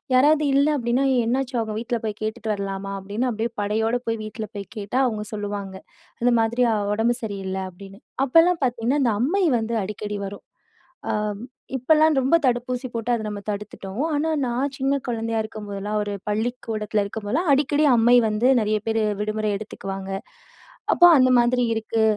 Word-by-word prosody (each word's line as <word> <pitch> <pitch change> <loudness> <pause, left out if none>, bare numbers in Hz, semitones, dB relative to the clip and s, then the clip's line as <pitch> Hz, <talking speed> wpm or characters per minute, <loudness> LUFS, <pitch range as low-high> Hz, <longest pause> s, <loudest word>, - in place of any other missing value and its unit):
யாராவது 300 +3 +5
இல்ல 280 +2 +4
அப்டின்னா, 240 +2 +1 0.2
"என்னாச்சு 260 +2 -1
அவுங்க 220 -1 -2
வீட்ல 235 +1 -2
போய் 215 -1 -4
கேட்டுட்டு 220 0 -3
வரலாமா?" 195 -1 -4
அப்டின்னு, 205 +6 -2
அப்டியே 225 +1 -2
படையோட 220 +3 0
போய் 225 -1 -1
வீட்ல 215 0 -5
போய் 200 -1 -5
கேட்டா, 210 +5 -3
அவுங்க 215 -3 -2
சொல்லுவாங்க. 200 -2 -4 0.5
இந்த 245 - +4
மாதிரி 235 +2 0
"அவ 210 - 0
உடம்பு 230 +2 +2
சரியில்ல' 190 -2 -3
அப்டின்னு. 195 +3 -13 0.3
அப்பலாம் 330 +4 +4
பாத்தீங்கன்னா, 245 +3 0
இந்த 230 -3 +2
"அம்மை" 370 +9 +1 0.2
வந்து 225 +1 -2
அடிக்கடி 210 +1 -5
வரும். 200 +1 -8 0.7
அ - - +1 0.6
இப்பல்லாம் 310 +3 +4
ரொம்ப 265 +6 +2
தடுப்பூசி 250 +1 0
போட்டு 230 +1 -2
அத 225 - -2
நம்ம 205 -1 -5
தடுத்துட்டோம். 205 +2 -5
ஆனா, 305 +2 0 0.2
நான் 255 +3 -1
சின்ன 270 +1 +1
கொழந்தையா 225 -1 -2
இருக்கும் 215 -1 -8
போதுலாம், 200 +1 -3
ஒரு 205 0 -4 0.2
பள்ளிக்கூடத்துல 215 -1 -1
இருக்கும் 205 +1 -6
போதுலாம், 325 - 0
அடிக்கடி 290 +2 +2
அம்மை 240 +2 +5
வந்து, 215 +3 +1
நறைய 215 0 +1
பேரு 225 0 +1 0.2
விடுமுறை 215 0 -1
எடுத்துக்குவாங்க. 195 -2 -6 0.8
அப்போ 350 - +7
"அந்த 255 0 +5
மாதிரி 245 +1 +3
இருக்கு, 225 0 -1
225 Hz, 160 wpm, -23 LUFS, 210-250 Hz, 0.8 s, அப்போ